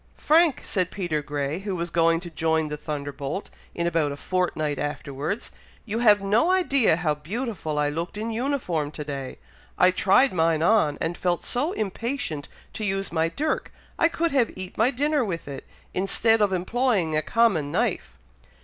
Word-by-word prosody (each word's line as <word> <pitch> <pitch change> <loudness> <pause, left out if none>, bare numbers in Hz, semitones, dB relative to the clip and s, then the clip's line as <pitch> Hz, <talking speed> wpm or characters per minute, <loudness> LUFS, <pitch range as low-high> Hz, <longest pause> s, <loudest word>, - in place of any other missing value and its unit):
"Frank!" 320 -2 +3
said 185 -3 -1
Peter 175 -6 -2
Grey, 145 +2 -3
who 195 -1 -3
was 170 -1 -3
going 165 0 +3
to 175 -2 -8
join 160 -1 0
the 150 - -3
Thunderbolt, 145 +2 -5 0.2
in 170 - -1
about 165 -4 +1
a 140 - -6
fortnight 155 -5 -1
afterwards, 145 - -4 0.3
"you 225 0 -2
have 210 -4 +5
no 215 - +3
idea 280 - +3
how 160 -3 0
beautiful 170 - -4
I 145 0 +2
looked 170 +6 -4
in 225 +2 -3
uniform 225 - -1
to 150 - -5
day! 140 -3 -6 0.4
I 180 - +6
tried 195 +8 +4
mine 165 -2 +2
on, 170 -7 +3
and 165 +1 -1
felt 175 -1 -1
so 285 +7 -1
impatient 220 - -3 0.3
to 220 - -5
use 195 -1 -1
my 165 0 +1
dirk, 305 - -2 0.3
I 330 - +5
could 335 0 -1
have 255 -5 +3
eat 185 0 -7
my 225 +3 +3
dinner 290 +1 +1
with 175 -9 -4
it, 140 -2 -7 0.3
instead 225 +4 +2
of 205 -2 +3
employing 190 -3 +1
a 155 - +2
common 170 -6 +2
knife." - - -1
180 Hz, 175 wpm, -25 LUFS, 155-225 Hz, 0.4 s, I